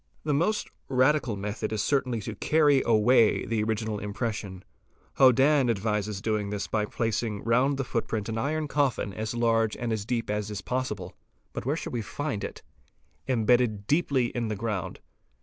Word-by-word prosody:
The 150 - 0
most 175 +9 +1 0.2
radical 130 -2 +2
method 105 +2 -4
is 110 -2 -1
certainly 125 -5 0
to 110 +2 -5
carry 145 +3 +3
away 115 0 +4
the 115 -2 -1
original 110 -1 -1
im 100 0 -5
pression. 100 -5 -4 0.6
Hodann®™ 135 +1 +5
advises 105 -1 -1
doing 105 -2 -1
this 105 -1 -3
by 105 -1 0
placing 110 -1 -2
round 125 +5 +2
the 135 - -1
footprint 110 -4 -2
an 110 0 -2
iron 155 +4 -1
coffin 135 -8 0
as 110 +2 -4
large 115 -2 +2
and 120 -1 -2
as 110 -2 -2
deep 115 -1 -2
as 105 -1 -3
possible, 125 -7 -3 0.4
(but - - -5
where 145 - +1
shall - - -5
we 120 - -1
find 135 0 -4
it - - -6 0.3
?), 75 +1 -40
embedded 120 -3 +2
deeply 140 -4 +1
in 120 -2 -1
the 110 - -2
ground. 105 -3 -3
115 Hz, 170 wpm, -27 LUFS, 105-130 Hz, 0.6 s, Hodann®™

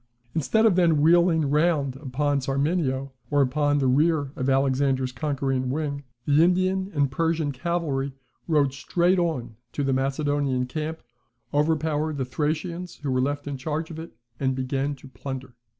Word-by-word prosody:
Instead 220 +8 +2
of 210 -5 +5
then 170 -4 +4
wheeling 165 0 +4
round 150 -2 +2
upon 140 +1 -1
Sarmenio, 135 0 0 0.2
or 145 -1 +4
upon 145 +2 +1
the 140 - +1
rear 145 +2 +2
of 130 0 -1
Alexander's 135 -1 +2
conquering 135 -2 -1
wing, 140 0 -2 0.2
the 145 +1 +4
Indian 185 +2 +2
and 140 -2 +2
Persian 160 0 0
cavalry 140 -2 -1 0.4
rode 145 -5 +2
straight 175 +6 +1
on 125 -10 -2 0.2
to 145 - -1
the 135 -1 +1
Macedonian 135 -1 0
camp, 155 +4 -4 0.5
overpowered 155 0 +1
the 130 - -1
Thracians 165 +6 -3
who 145 -3 -4
were 130 0 +2
left 145 +2 -1
in 140 -1 -3
charge 155 +4 -3
of 160 - -7
it, 160 -8 -10 0.2
and 130 -1 +1
began 135 +2 -1
to 135 0 -14
plunder. 130 -1 -7
145 Hz, 155 wpm, -25 LUFS, 135-160 Hz, 0.5 s, of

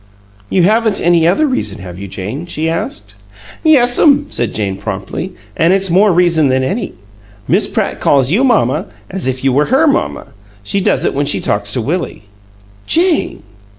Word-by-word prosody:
"You 185 - +2
haven't 220 +2 +2
any 170 -1 +3
other 195 - +2
reason, 115 - -2
have 90 -1 -9
you, 100 - -7
Jane?" 105 - -6
she 160 -1 -3
asked. 105 -11 -4 0.5
"Yes'm," 285 0 +4
said 120 - -1
Jane, 100 -3 -2
promptly. 100 - -5 0.2
"An' 170 +2 +3
it's 195 0 +1
a - - -1
more 200 +3 +4
reason 170 -4 +3
than 130 0 +1
any! 195 - -3 0.5
Miss - - +2
Pratt - - -2
calls 135 -1 +2
you 225 +9 +2
'mamma' 190 - +1 0.2
as 190 -6 -2
if 130 0 -3
you 135 -1 +2
were 145 +3 +2
HER 270 +6 +2
mamma. 285 - -1 0.3
She 195 - -2
does - - +1
it - - 0
when 140 +1 -1
she - - +2
talks 105 0 -1
to 125 - 0
Willie." 165 - -3 0.6
"Jane!" 340 0 +1
165 Hz, 180 wpm, -14 LUFS, 130-210 Hz, 0.6 s, Yes'm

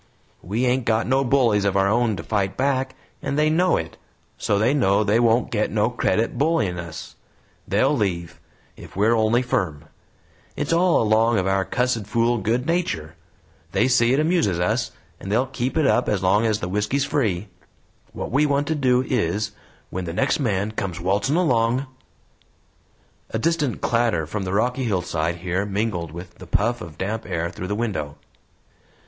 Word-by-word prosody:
We 110 +8 -1
ain't 125 0 +1
got 110 0 +1
no 135 +2 +2
bullies 120 -6 +3
of 100 -1 +1
our 95 0 +3
own 115 +1 +2
to 85 - -7
fight 100 -2 -1
back, 130 -1 0 0.3
and 140 - -2
they 155 0 +3
know 180 +3 +3
it, 80 0 -6 0.4
so 100 - 0
they 115 +6 +2
know 105 -7 +3
they 105 +2 +2
won't 120 0 +2
get 105 -2 0
no 110 +2 +1
credit 120 0 0
bullyin' 140 - +1
us; 85 +1 -8 0.5
they'll 130 +9 +2
leave, 85 - -2 0.4
if - - -13
we're 105 +4 +3
only 115 +3 +2
firm. 95 - -2 0.7
It's 145 +3 -1
all 175 -5 +3
along 110 +1 +3
of 95 - 0
our 95 0 +1
cussed 120 -1 -1
fool 115 +2 +1
good 115 +5 0
nature; 155 - -1 0.6
they - - +3
see 120 -2 +3
it 135 - +3
amuses 155 - +1
us, 90 - 0 0.3
and 95 - -6
they'll 120 +5 +2
keep 130 +2 -3
it 155 - +3
up 125 - +2
as 100 -3 0
long 105 +5 +3
as 110 -1 0
the 90 - -2
whisky's 105 +9 0
free. 105 -10 -1 0.6
What - - -6
we 145 +4 +3
want 140 0 +1
to - - +2
do 130 -3 +2
is, 105 -3 -1 0.4
when 95 0 -4
the 85 - -4
next 90 - +1
man 105 -5 0
comes 95 -5 -4
waltzin' 100 - 0
along 125 -6 +2 0.8
" - - -38
A - - -2
distant 150 -1 0
clatter 115 -9 +1
from 95 +5 -4
the 90 - -3
rocky 125 +5 0
hillside 85 -5 -1
here 90 +2 0
mingled 100 -5 -2
with 85 +1 -10
the 95 - -11
puff 115 +7 0
of 80 -3 -9
damp 110 +4 -3
air 85 +1 -2
through 95 - -6
the 105 - -2
window. 95 -11 -3
110 Hz, 180 wpm, -23 LUFS, 95-125 Hz, 0.8 s, bullies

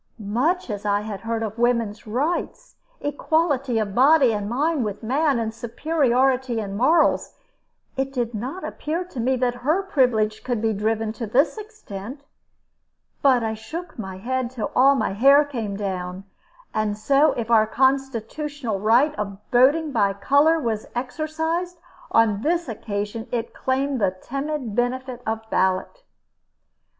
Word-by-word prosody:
Much 335 +10 +1
as 205 0 -5
I 205 -1 +1
had 210 -2 -6
heard 230 0 -2
of 220 +1 -5
woman's 230 -3 0
rights, 315 - -2 0.3
equality 290 -3 0
of 210 -3 -1
body 265 0 +5
and 205 -1 -3
mind 290 +3 0
with 210 +1 -5
man, 275 +4 +1
and 225 -1 -2
superiority 255 -1 +1
in 200 -2 -4
morals, 310 +10 +2 0.6
it 270 0 -1
did 240 -3 -2
not 255 - -5
appear 325 +4 -3
to 355 -8 -9
me 255 +3 +1
that 250 -1 0
her 315 +9 +1
privilege 245 - +1
could 245 -3 -1
be 220 0 +1
driven 220 +1 -1
to 230 0 -5
this 270 +9 +2
extent. 285 - -9 1.0
But 255 -4 +4
I 220 0 -1
shook 310 +9 -8
my 190 -3 -6
head 255 +4 -2
till 245 -3 -4
all 275 +2 +6
my 255 - -1
hair 275 +7 +6
came 225 -8 -4
down; 185 -2 -4 0.5
and 215 -1 -1
so 275 +7 +3
if 235 -1 -4
our 220 -1 +5
constitutional 265 -1 -1
right 240 +9 +4
of 200 -2 -3
voting 285 +6 +4
by 200 -6 +2
color 285 +10 +3
was 225 -6 -2
exercised, 320 +7 -2 0.3
on 215 -3 +3
this 340 +4 0
occasion 210 0 -4
it 235 -1 -3
claimed 265 -1 -1
the 190 -2 +1
timid 275 -2 -4
benefit 245 +1 -2
of 220 0 -3
ballot. 190 - 0
245 Hz, 150 wpm, -23 LUFS, 220-285 Hz, 1.0 s, all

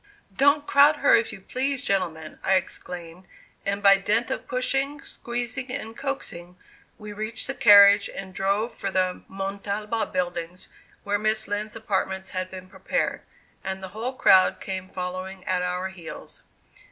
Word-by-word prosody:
"Don't 285 +3 +4
crowd 290 +2 +6
her, 285 -1 +3
if 230 - +1
you - - -9
please, 270 +6 -1
gentlemen," 165 - -2
I 190 - +4
exclaimed, 180 -1 -5 0.4
and 200 +1 -1
by 195 -1 +7
dint 225 +4 +1
of - - -4
pushing, 270 +3 0
squeezing 245 +2 -4
and 225 -3 -4
coaxing, 180 -11 -5 0.4
we 210 -1 -9
reached 215 +2 -3
the 270 - -2
carriage, 200 -3 +7
and 190 -1 -7
drove 200 +5 0
for 195 - -3
the 185 -1 0
Montalba 200 +3 -3
buildings, 175 -1 -3 0.3
where 205 0 0
Miss 215 +1 0
Lind's 210 +2 -3
apartments 190 -3 -2
had 185 -1 -3
been 185 0 -9
prepared, - - -2 0.4
and 190 0 -4
the 190 - -6
whole 225 +6 -4
crowd 190 -7 +5
came 190 -1 -5
following 185 +1 -6
at 185 -1 0
our 180 +1 -2
heels. 180 -3 -10
200 Hz, 155 wpm, -25 LUFS, 185-230 Hz, 0.4 s, by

